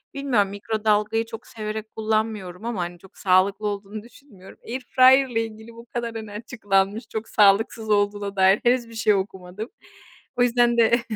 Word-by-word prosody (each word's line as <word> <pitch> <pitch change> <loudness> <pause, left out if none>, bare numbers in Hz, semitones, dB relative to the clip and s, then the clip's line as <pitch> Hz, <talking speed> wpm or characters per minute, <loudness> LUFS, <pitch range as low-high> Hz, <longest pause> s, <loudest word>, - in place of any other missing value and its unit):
bilmiyorum, 245 -8 +1
mikrodalgayı 210 +1 0
çok 225 -1 -10
severek 215 -1 -6
kullanmıyorum; 215 -3 -2
ama 225 -6 -2
hani, 175 0 -5
çok 190 - -19
sağlıklı 195 +2 +2
olduğunu 205 +1 -5
düşünmüyorum. 235 -6 -16
Airfryer'la 255 0 +4
ilgili 225 0 -6
bu 230 +1 -13
kadar 235 -1 -5
hani 220 -2 -7
açıklanmış, 205 0 -1
çok 220 +1 -5
sağlıksız 215 +2 +3
olduğuna 205 -1 0
dair 190 +1 +4
henüz 240 -1 +2
bir 230 - -12
şey 220 -1 +3
okumadım. 190 +2 -4 0.7
O 245 - +4
yüzden 240 0 +3
de 235 +1 +4
215 Hz, 150 wpm, -23 LUFS, 200-230 Hz, 0.7 s, Airfryer'la